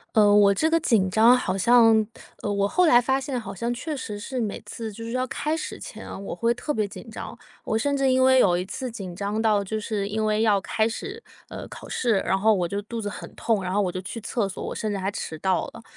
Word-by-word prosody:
呃， 205 -2 +6
我 205 -1 +6
这 255 +11 +2
个 330 - +4
紧 225 - +2
张， 225 +6 +5
好 195 -6 -2
像 225 +2 +5 0.4
呃， 205 - -2
我 200 0 +1
后 360 - +3
来 240 -6 +7
发 265 +2 +1
现 265 -2 -3
好 220 - -7
像 235 +6 -2
确 295 +6 -4
实 210 -6 -6
是 255 +5 -4
每 210 -3 -3
次 220 +1 -6
就 230 +3 -9
是 230 - -5
要 255 +1 0
开 305 +5 -2
始 320 - -5
前 - - -9
啊， - - -7
我 195 - -6
会 230 +7 +1
特 295 +5 -3
别 215 -5 0
紧 200 - -11
张。 - - -7 0.3
我 220 - 0
甚 280 +5 0
至 275 -1 +2
因 260 0 +3
为 260 0 +6
有 175 -7 +4
一 180 - -2
次 255 +6 -5
紧 195 -6 -7
张 205 +3 -2
到， 215 -2 +2
就 215 +3 -3
是 210 -2 -2
因 215 +1 -1
为 215 0 +1
要 210 -3 +4
开 220 +3 0
始， 400 - -6 0.3
呃， - - -7
考 - - -10
试， 235 -5 +1
然 190 - +1
后 220 +2 +4
我 180 -3 0
就 200 +4 -3
肚 230 +3 -5
子 210 - -4
很 205 - -7
痛， 220 -4 0
然 180 - -3
后 205 +2 +2
我 180 - -1
就 185 - -5
去 190 +5 -6
厕 210 -1 -1
所， 185 - -6
我 - - -4
甚 215 - -3
至 200 - -2
还 195 +1 -2
迟 160 -5 -5
到 190 +4 0
了。 230 - -12
220 Hz, 290 characters per minute, -25 LUFS, 200-245 Hz, 0.4 s, 来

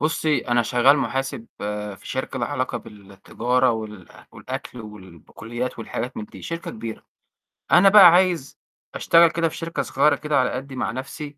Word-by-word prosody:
بُصّي، 155 0 +1
أنا 120 0 +3
شغّال 125 +4 +4
محاسب 135 -3 -3 0.5
في - - -22
شركة 130 0 -5
ليها 120 - -2
علاقة 130 -3 -3
بالتجارة 115 +4 -2
وال 110 -5 -6 0.3
والأكل 130 -1 -8
والبقوليات 105 +4 -8
والحاجات 120 +2 -5
من 105 - -5
دي، - - -14
شركة 165 0 -5
كبيرة. 110 0 -8 0.7
أنا 195 +3 +7
بقى 195 -2 +9
عايز 175 -6 +1 0.4
أشتغل 170 0 +5
كده 165 -1 0
في - - -10
شركة 165 0 -3
صغيرة 145 +2 +2
كده 150 +1 0
على 130 - +1
قدّي 135 +1 -6
مع 120 -4 -2
نَفْسي 145 +4 -7
130 Hz, 160 wpm, -22 LUFS, 115-150 Hz, 0.7 s, بقى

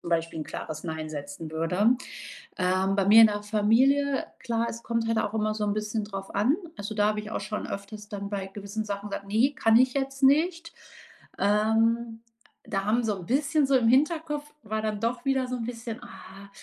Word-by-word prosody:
zum - - -8
Beispiel 165 -1 -1
'n 155 - -3
klares 155 +1 -6
Nein 160 -1 -4
setzen 145 +2 -7
würde. 180 +9 +2 0.6
Ähm, 185 +1 +1
bei 195 -1 +2
mir 220 +2 +9
in 220 - +9
der 205 0 -3
Familie 255 +7 +2
klar, 235 -1 -1
es 230 - -8
kommt 230 -1 -1
halt 230 0 +1
auch 210 - -1
immer 215 -1 0
so 215 - -2
'n 205 -1 +1
bisschen 215 0 -2
drauf 195 -2 -7
an. 235 +10 +3 0.2
Also, 205 +2 -5
da 210 -1 +2
habe 210 0 0
ich 210 +1 -7
auch - - -3
schon 210 - -4
öfters 210 +1 -7
dann 200 -1 -5
bei 200 -2 -3
gewissen 200 +2 -5
Sachen 200 0 -5
gesagt: 200 0 -6
„Ne, 235 +8 +2
kann 225 0 +4
ich 255 0 +4
jetzt 270 0 -2
nicht.“ 330 +4 +3 0.7
Ähm, 225 +2 +2 0.4
da 195 -3 -2
haben 230 +3 +2
so 215 -2 0
'n 175 - -9
bisschen 280 - +2
so, 275 - +3
im 230 -2 +2
Hinterkopf 295 +2 +1
war 215 0 -3
dann 210 -1 -2
doch 235 +2 -2
wieder 265 -2 +1
so 250 - -3
'n 235 - -4
bisschen: 230 -1 -6
„Ah, 195 +1 -12
215 Hz, 210 wpm, -27 LUFS, 200-245 Hz, 0.7 s, mir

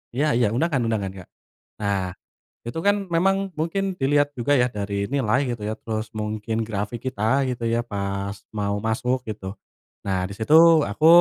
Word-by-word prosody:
Iya 145 - +2
iya 120 -4 +3
undangan 140 -2 +1
undangan, 105 -4 -1
Kak. 90 - -10 0.5
Nah, 100 -1 +1 0.7
itu 120 +8 -4
kan 205 0 +5 0.2
memang 195 +3 +4 0.2
mungkin 165 +5 0 0.2
dilihat 145 +2 +3
juga 120 +4 +1
ya 125 - +4
dari 100 0 -3 0.2
nilai 120 -4 +2
gitu 120 -3 -4
ya, 110 - -1
terus 110 -1 -3
mungkin 105 +1 -3
grafik 105 +2 -3
kita 120 -5 -6 0.3
gitu 125 -2 -4
ya 115 - +2
pas 100 0 -3 0.2
mau 100 0 0
masuk 125 +3 +1
gitu. 105 -3 -6 0.6
Nah, 95 -1 +1
di - - -7
situ 115 +7 +2 0.4
aku 130 +10 +1
110 Hz, 165 wpm, -24 LUFS, 100-135 Hz, 0.7 s, kan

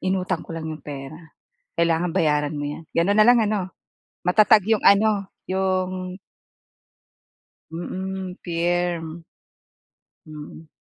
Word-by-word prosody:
inutang 185 0 -1
ko 165 - -8
lang 160 - -5
'yong 155 -1 -6
pera." 145 +2 -8 0.6
Kailangan 170 +1 +2
bayaran 150 -3 +1
mo 145 - -3
'yan 150 +3 -5
gano'n 190 +5 +3
na 215 - +7
lang 245 0 +7
ano, 210 -1 0 0.6
matatag 210 +2 +5
'yong 220 -1 +2
ano, 200 -1 +4 0.2
'yong 185 -1 -1 1.5
Mm, 185 +2 -5
firm. 170 -1 -1 1.0
Mm. 155 +1 -10
180 Hz, 110 wpm, -23 LUFS, 160-190 Hz, 1.5 s, na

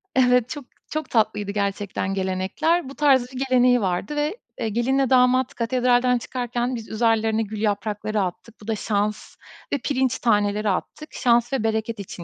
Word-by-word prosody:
Evet, 250 -2 +4
çok 290 -3 -6 0.2
çok 310 0 -4
tatlıydı 210 -3 +1
gerçekten 200 -1 -2
gelenekler. 195 - 0
Bu 275 - -10
tarz 265 -4 +3
bir 255 - -5
geleneği 250 -1 +4
vardı 190 +10 -2
ve, 295 +8 -1 0.2
eee, 225 - -1
gelinle 255 +4 +1
damat 255 0 +3
katedralden 250 +1 +2
çıkarken 245 +1 -3
biz, 225 -2 -8
üzerlerine 225 0 +1
gül 210 0 -6
yaprakları 210 0 -1
attık. 215 +5 -5
Bu 205 - -13
da 225 - 0
şans 210 0 -2 0.4
ve - - +3
pirinç 265 -2 -1
taneleri 210 -2 +1
attık. 305 +10 -4
Şans 240 0 +2
ve 260 -5 0
bereket 220 0 -1
için 185 -3 -8
230 Hz, 160 wpm, -23 LUFS, 210-255 Hz, 0.4 s, Evet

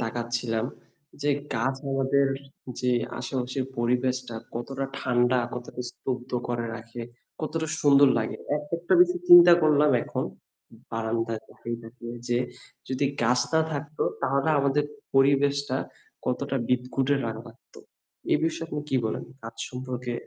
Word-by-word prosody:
তাকাচ্ছিলাম 120 -1 -1 0.6
যে 145 - +2 0.2
গাছ 125 +4 +1 0.2
আমাদের 135 +1 +3 0.5
যে 125 - +1 0.3
আশেপাশের 130 0 -2
পরিবেশটা 125 +1 0 0.2
কতটা 135 +3 -3
ঠান্ডা 125 0 +2 0.2
কতটা, 125 0 -7
স্তব্ধ 125 0 -5 0.2
করে 120 -1 -1
রাখে, 115 +1 -8 0.4
কতটা 160 0 -2
সুন্দর 140 -1 +7
লাগে! 110 - -2 0.2
একা 150 +2 -4
একটা 170 - +2
বিষয় 360 0 +4
চিন্তা 350 - +11
করলাম 150 -1 +5
এখন - - -3 0.7
বারান্দায় 115 0 -2
তাকিয়ে, 120 0 -6
তাকিয়ে 115 +1 -9
যে 120 0 +2 0.5
যদি 130 +2 0 0.2
গাছ 125 +2 +3
না 160 - +5
থাকতো 150 +1 -3 0.2
তাহলে 135 +3 +1
আমাদের 140 +1 +2 0.3
পরিবেশটা 140 0 +3 0.5
কতটা 135 +2 -1
বিদঘুটে 125 +2 +1
রা 115 - -1
লাগতো। 115 +1 -16 0.5
এ - - +6
বিষয়ে 165 0 -2
আপনি 150 - -3
কি 135 - +3
বলেন? 110 - -2 0.2
গাছ 115 0 -8
সম্পর্কে 125 -1 -4
130 Hz, 130 wpm, -27 LUFS, 120-140 Hz, 0.7 s, চিন্তা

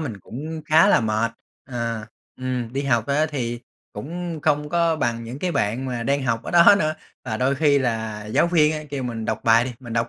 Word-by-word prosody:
mình 115 -11 -5
cũng 155 - -7
khá 160 +6 +5
là - - +5
mệt. 110 +1 0 0.3
Ờ, 115 -4 -4 0.3
ừm, 125 -2 -3
đi 135 +2 -2
học 120 -5 +1
á 150 +3 +2
thì 120 -5 -4 0.3
cũng 170 +1 -5
không 150 0 +1
có 170 0 +2
bằng 115 -5 -1
những 120 +4 -7
cái 180 +3 -2
bạn 110 +3 -1
mà 120 -2 -3
đang 140 +3 0
học 115 -2 -1
ở - - -6
đó 175 +3 +7
nữa. 155 0 0 0.3
Và 110 -4 -3
đôi 130 +4 +1
khi 145 -1 +3
là 110 -4 -2
giáo 110 - +2
viên 160 -3 +3
á 155 -1 -4
kêu 140 -2 -3
mình 115 -3 -4
đọc 110 -1 -2
bài 115 +1 +5
đi, 125 - -4
mình 120 -3 -8
đọc 115 0 0
130 Hz, 225 wpm, -23 LUFS, 115-155 Hz, 0.3 s, đó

